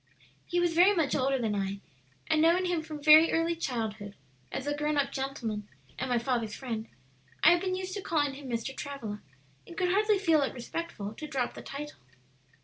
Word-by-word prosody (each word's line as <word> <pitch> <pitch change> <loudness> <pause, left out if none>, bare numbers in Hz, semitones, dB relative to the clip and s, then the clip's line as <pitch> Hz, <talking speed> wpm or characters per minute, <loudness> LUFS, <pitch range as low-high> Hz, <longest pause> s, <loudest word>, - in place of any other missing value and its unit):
"He 350 - 0
was 350 -1 +2
very 365 +5 +6
much 310 -6 +1
older 270 0 +2
than 225 -4 -1
I, 200 0 -2 0.5
and 310 - +2
knowing 340 +3 +4
him 350 -3 0
from 305 -2 -8
very 310 +2 +8
early 330 +1 +1
childhood, 220 -9 -4 0.4
as 270 - -4
a 290 0 -1
grown 300 0 0
up 275 -1 +1
gentleman 235 -7 -4 0.3
and 260 - -2
my 245 - +2
father's 235 -3 -1
friend, 230 -4 -4 0.6
I 330 - +9
had 350 0 +3
been 370 -1 -1
used 375 0 -4
to 400 - -4
calling 290 -6 0
him 275 -1 -9
Mr. 235 +3 -3
Travilla, 235 -8 -6 0.5
and 340 - -11
could 360 -1 +1
hardly 420 +2 +3
feel 330 -6 +3
it 275 - -1
respectful 240 -5 -5
to 305 +7 -7
drop 265 -4 -2
the - - -9
title. 295 +2 -7
285 Hz, 200 wpm, -29 LUFS, 240-335 Hz, 0.6 s, I